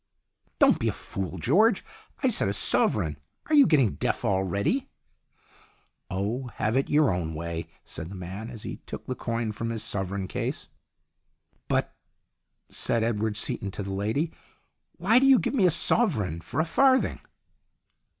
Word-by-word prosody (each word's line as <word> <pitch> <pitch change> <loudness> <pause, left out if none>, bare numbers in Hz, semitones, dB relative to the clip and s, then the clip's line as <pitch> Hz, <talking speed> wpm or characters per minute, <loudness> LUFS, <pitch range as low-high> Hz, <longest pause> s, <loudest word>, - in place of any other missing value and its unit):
"Don't - - +5
be - - 0
a - - +1
fool, 95 -2 -5
George. 190 - +3 0.4
I 260 - +4
said 220 - +2
a 100 - 0
sovereign. 80 -5 +2 0.3
Are 310 - -3
you 285 -3 +7
getting 130 - +3
deaf - - -1
already? 100 - 0 0.5
" - - -31
" - - -42
Oh, 105 +8 -2
have 110 +3 0
it 135 - +1
your 150 -8 +4
own 80 -3 -3
way," 85 0 -4 0.2
said 80 - -6
the 100 - -8
man, 95 +5 -7
as 115 -4 -9
he - - -6
took - - -7
the 130 - -3
coin 115 -2 -3
from 115 +2 -4
his 115 -1 -3
sovereign 95 -1 -2
case. - - -4 1.0
"But," - - 0 0.7
said 115 -1 0
Edward 110 -2 -1
Seaton 100 -1 -1
to 100 - -5
the 95 0 -5
lady, 110 - -1 0.6
"why 210 +8 +3
do 270 - +4
you 270 -1 +8
give - - -1
me 205 -9 +4
a - - +5
sovereign 115 - +2
for 105 - -4
a 160 - +3
farthing 260 +9 +3
110 Hz, 170 wpm, -27 LUFS, 95-155 Hz, 1.0 s, you